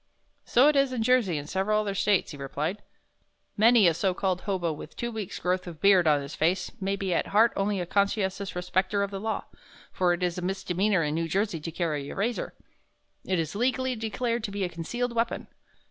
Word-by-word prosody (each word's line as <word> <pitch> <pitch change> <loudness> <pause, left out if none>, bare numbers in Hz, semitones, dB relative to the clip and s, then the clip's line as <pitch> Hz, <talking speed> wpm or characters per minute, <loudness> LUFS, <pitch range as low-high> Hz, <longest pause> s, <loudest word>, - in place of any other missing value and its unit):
"So 255 +4 +5
it 300 - +4
is 275 -1 +3
in 240 -3 -1
Jersey 230 -9 +3
and 145 0 -6
several 200 +5 +1
other 205 -2 -2
States," 195 0 +1
he 145 - -8
replied. 150 +8 -3 0.7
"Many 225 -2 +6
a 170 - +4
so 180 +3 0
called 185 -2 -1
hobo 180 -5 -1
with 150 +1 -10
two 235 0 -3
weeks' 215 -4 -5
growth 185 0 -1
of 165 -3 -8
beard 190 -4 +5
on 145 -2 +3
his 140 - -8
face 175 +3 0
may 195 +1 0
be 195 -2 -2
at - - 0
heart 225 +3 +4
only 200 0 0
a 175 - -2
conscientious 200 0 0
respecter 185 +3 0
of 200 - -3
the 195 - -4
law 220 +2 -3 0.5
for 180 -1 +2
it 175 +1 -3
is 180 0 -1
a - - -5
misdemeanor 190 0 0
in 150 0 -1
New 165 +1 -1
Jersey 195 0 0
to 155 - -5
carry 155 -4 -2
a - - -7
razor. 225 +4 -2 0.7
It 185 - 0
is 160 -3 -2
legally 260 +3 0
declared 230 +1 -2
to - - -4
be 200 0 -2
a 180 - -1
concealed 235 +9 -3
weapon. 230 0 -1
195 Hz, 215 wpm, -27 LUFS, 175-215 Hz, 0.7 s, Many